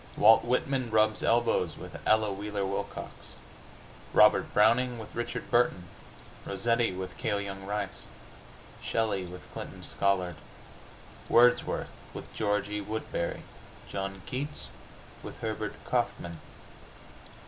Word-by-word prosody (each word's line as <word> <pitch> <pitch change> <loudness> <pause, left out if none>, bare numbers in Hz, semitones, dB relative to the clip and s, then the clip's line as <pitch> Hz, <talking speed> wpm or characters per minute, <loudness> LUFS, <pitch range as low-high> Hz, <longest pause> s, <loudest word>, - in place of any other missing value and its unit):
Walt 110 +2 +7
Whitman 125 +1 0
rubs 110 0 +3
elbows 115 -8 +2
with - - -9
Ella 110 -2 +4
Wheeler 100 0 -3
Wilcox; 95 +1 -5 0.8
Robert - - +6
Browning 120 +4 +4
with 110 -2 -9
Richard 120 - -4
Burton; 120 -6 +3 0.6
Rossetti 115 +4 +1
with 95 0 -6
Cale 100 - 0
Young 95 -1 -6
Rice; 100 -1 -3 0.7
Shelly 105 -5 0
with 90 +1 -9
Clinton - - -7
Scollard; 90 -4 +1 0.9
Wordsworth 120 +1 +4 0.3
with - - -8
George 105 -1 0
E. 105 0 -3
Woodberry; 105 -4 -3 0.5
John 95 -1 -4
Keats 135 - -3 0.5
with - - -8
Herbert 110 -1 -3
Kaufman! 85 -2 -1
105 Hz, 110 wpm, -29 LUFS, 95-115 Hz, 0.9 s, Walt